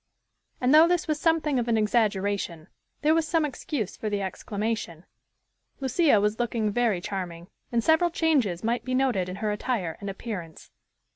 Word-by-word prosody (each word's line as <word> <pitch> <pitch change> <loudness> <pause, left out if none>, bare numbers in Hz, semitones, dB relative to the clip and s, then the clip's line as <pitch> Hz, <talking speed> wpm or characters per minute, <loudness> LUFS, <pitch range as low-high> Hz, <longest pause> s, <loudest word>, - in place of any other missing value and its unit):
And, 255 +2 +2
though 315 +2 +8
this 355 -1 +1
was 305 -1 0
something 315 -4 +2
of 240 - -2
an 230 -1 +2
exaggeration, 200 -6 0 0.3
there 305 +1 +5
was 325 -1 +1
some 320 -1 +2
excuse 255 -6 -4
for 215 - -4
the 205 -1 -1
exclamation. 200 -2 -4 0.7
Lucia 270 - +3
was 210 +2 0
looking 230 -3 0
very 230 -4 +1
charming, 180 -3 -5 0.2
and 235 -1 +1
several 320 +4 +4
changes 275 - +1
might 235 +1 0
be 255 +1 -2
noted 245 -9 +1
in 185 - -5
her 210 +1 -2
attire 210 -6 -2
and 200 - -4
appearance. 190 -5 -7
225 Hz, 165 wpm, -26 LUFS, 200-275 Hz, 0.7 s, though